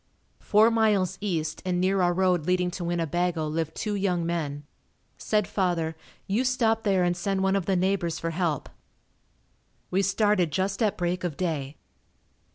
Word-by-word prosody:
Four 215 +2 +4
miles 215 -5 +2
east 165 -7 -2
and 180 -1 -1
near 190 +1 +2
our 175 -1 +3
road 180 -3 +1
leading 180 0 +1
to 175 0 -5
Winnebago 170 0 -1
lived 160 +1 -3
two 210 - -2
young 185 -4 0
men. 150 -4 -3 0.6
Said 210 -2 0
father, 170 -4 -1 0.3
"You 210 +6 0
stop 230 -3 +1
there 195 -4 +2
and 175 0 +1
send 190 +2 -1
one 190 0 +2
of 195 -4 -1
the 195 - +2
neighbors 180 -2 0
for 165 - -3
help." 165 -4 -1 1.2
We 190 +2 +2
started 195 -3 +2
just 190 +7 -1
at 215 -3 +1
break 180 +1 -1
of 170 -5 -3
day. 155 -5 -3
180 Hz, 165 wpm, -26 LUFS, 170-195 Hz, 1.2 s, Four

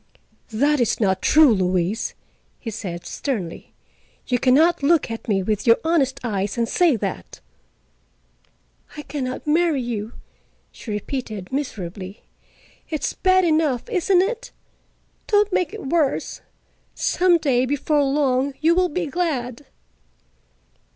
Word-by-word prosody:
"That 285 +6 +1
is 235 -3 +1
not 190 -4 +1
true, 300 -5 +6
Louise," 185 +2 -1 0.4
he 230 - -6
said 180 -5 -6
sternly. 205 - -4 0.5
"You 250 -1 0
can 255 +1 +4
not 330 +3 +4
look 300 -3 +2
at 225 - -7
me 195 -3 +1
with 210 +3 -2
your 230 - +7
honest 320 -5 +1
eyes 205 -2 -2
and 230 -1 +1
say 340 -1 +3
that." 220 - -5 1.6
"I 295 - -6
can 285 -4 -4
not 255 0 -5
marry 315 -1 +2
you," 225 -1 -4 0.6
she - - -11
repeated 210 -2 -5
miserably. 195 -7 -5 0.7
"It's 310 -2 -2
bad 370 -1 +3
enough, 310 -6 +1
isn't 370 -2 +3
it? 470 +4 -4 0.8
Don't 415 -2 +2
make 360 - +1
it 430 -7 -8
worse. 300 -1 0 0.5
Some 360 -1 +3
day, 260 -5 +1
before 290 +2 +1
long, 270 -1 +1
you 325 +2 +4
will 360 +1 +2
be 350 +3 -2
glad." 280 -7 -3
270 Hz, 130 wpm, -22 LUFS, 225-325 Hz, 1.6 s, your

